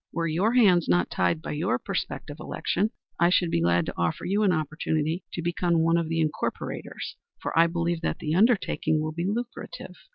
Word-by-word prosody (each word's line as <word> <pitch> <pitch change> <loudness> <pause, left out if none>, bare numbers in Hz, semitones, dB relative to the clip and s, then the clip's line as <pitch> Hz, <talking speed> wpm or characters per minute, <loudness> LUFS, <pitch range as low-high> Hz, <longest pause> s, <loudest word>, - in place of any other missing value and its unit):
Were 165 - -1
your 180 +8 +1
hands 190 -9 +5
not 90 0 +2
tied 90 - +1
by - - -4
your 150 -5 0
prospective - - -4
election, 205 +5 -1 0.3
I 170 +1 +5
should 175 -2 +2
be 85 - +1
glad 85 0 +3
to - - -4
offer 85 -1 -1
you 200 +3 +1
an 205 -3 +4
opportunity 155 +1 -1
to 170 - -3
become 175 -1 +1
one 165 +1 +3
of 165 -2 -1
the 165 0 0
incorporators, 155 -1 -3 0.2
for - - -4
I 165 +1 +6
believe 170 0 -1
that - - -1
the 155 -1 -2
undertaking 200 -5 +2
will 155 0 -2
be 170 +3 -3
lucrative. 235 +4 -5
165 Hz, 195 wpm, -26 LUFS, 155-180 Hz, 0.3 s, I